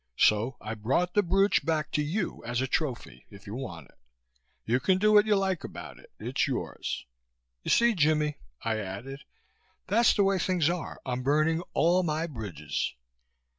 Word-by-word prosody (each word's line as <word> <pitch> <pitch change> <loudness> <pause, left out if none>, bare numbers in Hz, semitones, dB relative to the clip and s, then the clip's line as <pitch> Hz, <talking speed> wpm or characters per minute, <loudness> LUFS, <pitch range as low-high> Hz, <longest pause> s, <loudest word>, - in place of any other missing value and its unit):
So 110 +5 +3
I 110 - -5
brought 135 +12 0
the 205 - +4
brooch 195 +1 +3
back 155 -2 -1
to 150 - +1
you 175 +6 -2
as 120 +1 -2
a 130 - +1
trophy, 125 - -3
if 100 +1 -14
you 100 - -7
want 95 - -7
it. - - -27 0.7
You 120 +3 +2
can 185 +6 +2
do 215 +2 +3
what 210 0 +6
you 210 - +4
like 190 -3 0
about - - -8
it. - - -18
It's - - 0
yours. - - -3 0.6
You - - -5
see, 235 0 +5
Jimmie," 150 -4 +1 0.2
I 110 -1 0
added, 115 +8 -7 0.6
"that's 225 +3 +4
the 200 - +4
way 195 -1 +2
things 175 -3 +2
are. 175 -3 -5
I'm 125 -1 -2
burning 155 +5 +2
all 175 +3 +4
my 160 -1 -1
bridges." 105 - -4
150 Hz, 175 wpm, -28 LUFS, 120-185 Hz, 0.7 s, what